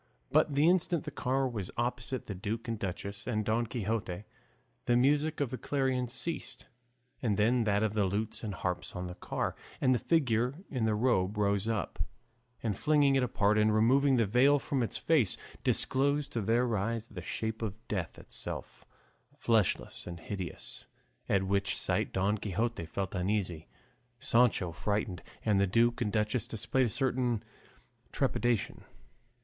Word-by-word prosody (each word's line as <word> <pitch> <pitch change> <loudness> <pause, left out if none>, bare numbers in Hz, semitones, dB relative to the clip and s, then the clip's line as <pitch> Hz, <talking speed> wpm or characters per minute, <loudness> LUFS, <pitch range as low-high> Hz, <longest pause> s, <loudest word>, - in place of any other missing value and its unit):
But 145 - +3
the 145 +3 +4
instant 175 -2 +2
the 150 - -5
car 135 -1 0
was 105 -7 -4
opposite 125 +1 -2
the 105 - -4
duke 105 +5 -4
and 115 -2 -2
duchess 100 +1 -5
and 110 -4 0
Don 115 +2 +1
Quixote 105 -5 -2 0.6
the 120 - +3
music 145 +4 +2
of 140 -4 0
the 130 - -4
clarions 130 -3 0
ceased, 165 +4 -4 0.6
and 105 -5 +1
then 115 +3 +3
that 100 0 +2
of 110 -1 0
the 105 -2 +2
lutes 105 +5 -2
and 105 -3 -3
harps 90 0 -3
on 90 - -3
the 90 - -5
car, - - -3 0.2
and 130 -1 +4
the 125 - +1
figure 125 -5 +2 0.2
in 125 -6 0
the 110 -1 +2
robe 105 -4 +1
rose 100 0 +1
up, 110 -2 -2 0.6
and 110 -4 0
flinging 145 +2 +3
it 135 - +4
apart 110 -3 +2
and 105 0 +4
removing 135 +5 +4
the 115 -2 +3
veil 125 +8 +5
from 135 -1 -1
its 115 - -1
face, 145 - +2 0.3
disclosed 140 +2 +1
to 115 - 0
their 115 +3 +2
eyes 115 +3 -1
the 95 -6 -8
shape 110 +6 -3
of 105 -4 -2
Death 95 -6 -3
itself, - - -7 0.5
fleshless 110 -4 +1
and 85 -1 -6
hideous, 95 -2 -6 0.4
at 95 -1 +3
which 100 +1 0
sight - - 0
Don 100 +3 +1
Quixote 105 -2 -2
felt 95 +3 -3
uneasy, 90 -3 -1 0.5
Sancho 115 -7 +3
frightened, 95 0 -2 0.2
and 105 -3 +3
the 100 - +3
duke 120 +5 +2
and 105 -3 +1
duchess 105 +3 0
displayed 125 +3 +1
a - - -2
certain 125 -2 0 0.7
trepidation. 120 -5 0
110 Hz, 165 wpm, -31 LUFS, 100-125 Hz, 0.7 s, veil